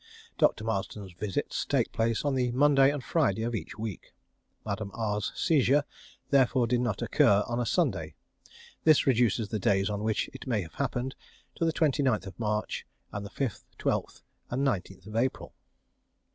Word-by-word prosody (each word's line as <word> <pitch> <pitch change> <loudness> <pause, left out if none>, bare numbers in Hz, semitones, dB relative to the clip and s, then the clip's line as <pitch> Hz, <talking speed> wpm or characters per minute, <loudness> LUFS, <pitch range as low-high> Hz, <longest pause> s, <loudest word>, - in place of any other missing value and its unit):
Dr. - - +3
Marsden's 100 -3 -3
visits 95 +2 -2
take - - 0
place 115 +3 0
on 145 - +2
the 125 -2 +1
Monday 135 0 +5
and 145 -3 -4
Friday 115 - +1
of 120 +1 -2
each 110 - -5
week. 110 -4 -6 0.5
Madame 100 0 -3
R's 105 -2 -1
seizure 145 -3 +3 0.5
therefore 130 -2 +4
did 120 +1 +1
not 120 -5 -1
occur 100 0 +4
on 120 0 -2
a 120 - -1
Sunday. - - 0 0.7
This 155 -2 +5
reduces 115 -4 +2
the 110 - -2
days 95 +1 +2
on 105 0 -2
which 110 -1 0
it 130 - -9
may 110 -6 +1
have 80 - -12
happened 130 -1 -2 0.4
to 165 - -1
the 165 - +3
29th 130 - +1
March 105 -1 -2 0.2
and 100 0 -5
5th, 120 0 -3
12th, - - -2 0.3
and 135 +3 0
19th 95 -3 -3
April. 125 +3 -1
115 Hz, 160 wpm, -29 LUFS, 105-130 Hz, 0.7 s, Monday